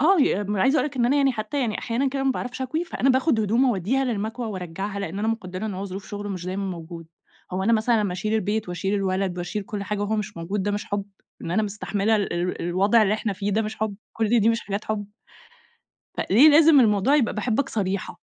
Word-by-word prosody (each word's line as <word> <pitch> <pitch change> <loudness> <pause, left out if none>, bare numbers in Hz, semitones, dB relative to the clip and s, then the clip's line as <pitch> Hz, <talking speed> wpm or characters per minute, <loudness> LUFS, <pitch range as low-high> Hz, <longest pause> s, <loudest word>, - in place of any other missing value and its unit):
آه، 345 +3 +5
ي 205 -6 +2
م 205 +1 -2
عايزة 265 +10 +3
أقول - - +2
لك 280 - -14
إن 240 -1 +2
أنا 275 - +2
يعني 275 -2 +3
حتى 220 +5 -3
يعني 225 -5 -1
أحيانًا 250 +4 0
كده 270 +1 -2
ما 270 - +3
باعرفش 255 0 -4
أكوي، 315 +7 -2
فأنا 270 -5 +1
باخد 260 -2 +2
هدومه 230 +5 +2
أوديها 235 +7 0
للمكوى 225 0 -3
وأرجعها، 195 0 -5
لإن 195 0 -4
أنا 220 +2 0
مقدرة 195 -3 -3
إن 205 - -4
هو 190 +2 -4
ظروف 195 0 -7
شغله 205 0 -5
مش 180 -2 -5
دايمًا 190 +2 -3
موجود، 170 -3 -7 0.5
هو 185 +1 -1
أنا 225 +4 +2
مثلًا 225 0 +3
لمّا 200 -3 -1
أشيل 210 +4 -2
البيت 215 -1 -1
وأشيل 190 +3 -2
الولد 190 -2 -1
وأشيل 175 +4 -3
كل 200 +1 -5
حاجة 210 +1 -3
وهو 205 +2 0
مش 210 -4 -4
موجود، 185 +4 -3
ده 205 - 0
مش 205 0 -2
حب؟ 205 -1 -3 0.4
إن - - -5
أنا 195 +5 +2
مستحملة 210 +1 0
ال 205 -2 -1
ال 175 +1 -2
الوضع 195 +6 +3
اللي 210 0 +2
إحنا 215 -1 -2
فيه، 200 +1 -3
ده 220 +3 +2
مش 215 0 -5
حب؟ 215 -2 -2 0.2
كل 225 +1 +2
دي 215 - +3
مش 230 0 +2
حاجات 200 +1 -4
حب؟ 210 -2 -3 1.1
فليه 245 +11 +5
لازم 310 -1 +7
الموضوع 215 +3 +3
يبقى 250 -7 +1
باحبك 240 +5 0
صريحة. 195 -2 -3
210 Hz, 235 wpm, -24 LUFS, 195-235 Hz, 1.1 s, لازم